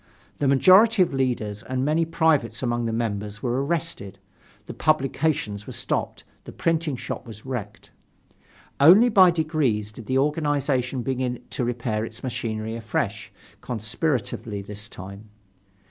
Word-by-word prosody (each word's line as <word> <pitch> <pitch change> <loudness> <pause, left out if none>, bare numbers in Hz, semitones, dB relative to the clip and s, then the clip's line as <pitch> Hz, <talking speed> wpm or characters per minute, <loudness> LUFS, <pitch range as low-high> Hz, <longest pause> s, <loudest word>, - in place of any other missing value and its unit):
The 145 - +1
majority 190 - +6
of 175 - -3
leaders, 120 -6 -1
and 130 +3 -2
many 160 +3 +2
privates 160 -8 +1
among 120 -1 0
the - - -1
members 105 -2 -3
were 125 +2 0
arrested, 150 - -3 0.5
the - - -7
publications 135 -8 0
were - - -7
stopped, - - -3 0.2
the - - -8
printing 165 -3 0
shop 120 - -6
was 105 0 -11
wrecked. 120 -6 -6 0.9
Only 190 - +8
by 190 -5 +7
degrees 155 -11 0
did 110 0 -11
the 130 - +1
organization 140 -3 0
begin 125 -1 -2
to - - -2
repair 120 -3 -2
its 115 +2 -8
machinery 110 -3 -3
afresh, 110 -2 -3 0.3
conspiratively 110 -2 -3
this 105 +1 -8
time. 100 +3 -10
125 Hz, 135 wpm, -24 LUFS, 110-150 Hz, 0.9 s, Only